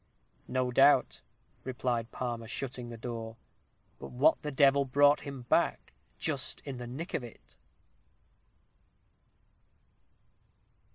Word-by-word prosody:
"No 125 0 -1
doubt," 135 +1 +4 0.4
replied 120 -3 -2
Palmer, 120 -2 -4
shutting 125 0 -5
the 115 - -8
door. 115 -1 -6 0.6
"But - - -8
what 125 +4 +3
the 150 -2 -4
devil 140 0 +4
brought 145 +2 +4
him 140 -3 -7
back, 120 - 0 0.2
just - - -2
in 135 -3 -7
the 120 0 -7
nick 155 +10 -6
of 130 - -1
it?" 120 - -13
125 Hz, 110 wpm, -31 LUFS, 120-140 Hz, 0.6 s, doubt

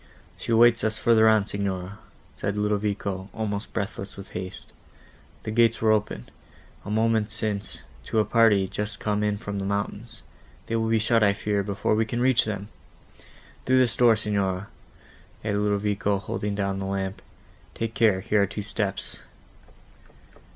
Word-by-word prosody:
"She - - -6
awaits 115 0 +5
us 110 0 0
further 110 -1 +5
on, 110 -2 +4
Signora," 100 -1 -4 0.3
said 100 0 -3
Ludovico, 105 -2 -1
almost 105 -2 -3
breathless 100 -1 -4
with 100 - -10
haste; 95 0 -7 0.7
"the 110 - -4
gates 115 0 +3
were 110 -1 +3
open, 105 - -1 0.6
a - - -8
moment 110 0 +1
since, 105 -2 -3 0.2
to - - -2
a 110 - +4
party 105 -3 +4
just 105 +2 -4
come 105 -1 -1
in 105 -1 0
from 100 -1 -5
the 95 - -3
mountains: 100 +3 -4 0.4
they 115 - -2
will 110 0 0
be 115 - +3
shut, 110 +1 +2
I 100 -1 +4
fear, 105 0 -1
before 100 +1 -1
we 110 +1 +2
can 120 +2 -2
reach 130 0 +4
them! 105 -1 -4 1.0
Through 130 0 +4
this 125 -3 +3
door, 120 -2 +5
Signora," 100 -3 -1 0.8
added 105 -1 0
Ludovico, 105 0 0
holding 100 +1 -3
down 100 -1 -1
the 95 - -3
lamp, 95 0 -3 0.5
"take 115 0 -3
care, 105 -5 +3
here 105 +2 +2
are 100 - +2
two 100 +2 -5
steps." 105 -2 -1
105 Hz, 160 wpm, -25 LUFS, 100-110 Hz, 1.0 s, awaits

